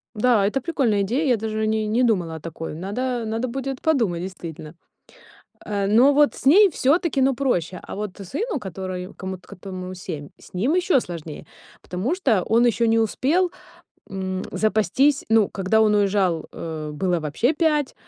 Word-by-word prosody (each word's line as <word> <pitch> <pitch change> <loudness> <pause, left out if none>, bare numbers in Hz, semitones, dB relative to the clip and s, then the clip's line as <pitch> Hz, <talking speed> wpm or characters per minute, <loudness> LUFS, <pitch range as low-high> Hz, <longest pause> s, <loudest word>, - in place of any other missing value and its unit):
Да, 220 -2 +3
это 240 +7 0
прикольная 245 -10 +1
идея, 245 +11 0
я 245 -3 +3
даже 220 0 -3
о - - +1
ней 215 0 0
не 230 +4 +2
думала 180 -9 +1
о - - -7
такой, 165 0 -7
надо 235 +9 -3
надо 225 +3 -2
будет 270 +1 -4
подумать 225 - +1
действительно. 170 -4 -8 0.9
А, 200 -2 -1
но 235 +8 +5
вот 290 +1 +4
с - - -10
ней 390 +8 +7
всё-таки, 290 0 +1
ну, 265 0 +3
проще, 190 - -1
а - - -8
вот 205 -2 -5
сыну, 295 - -3
которой 185 -2 -6
комут 185 -1 -7
котому 185 -1 -8
7, 150 -5 -7
с - - -17
ним 235 - +1
ещё 360 -6 +3
сложнее, 165 -6 -8 0.4
потому 190 - -2
что 255 - +1
он 235 +2 +3
ещё 235 0 +2
не 225 0 +3
успел, 295 - +1 0.6
м, 190 -1 -3
запастись, 220 - +2
ну, 225 -2 +4
когда 195 +3 +1
он 215 -1 +4
уезжал, 195 -5 +1
э, 155 -2 -6
было 175 +3 0
вообще 160 - 0
5. 300 -3 +1
215 Hz, 175 wpm, -23 LUFS, 185-260 Hz, 0.9 s, ней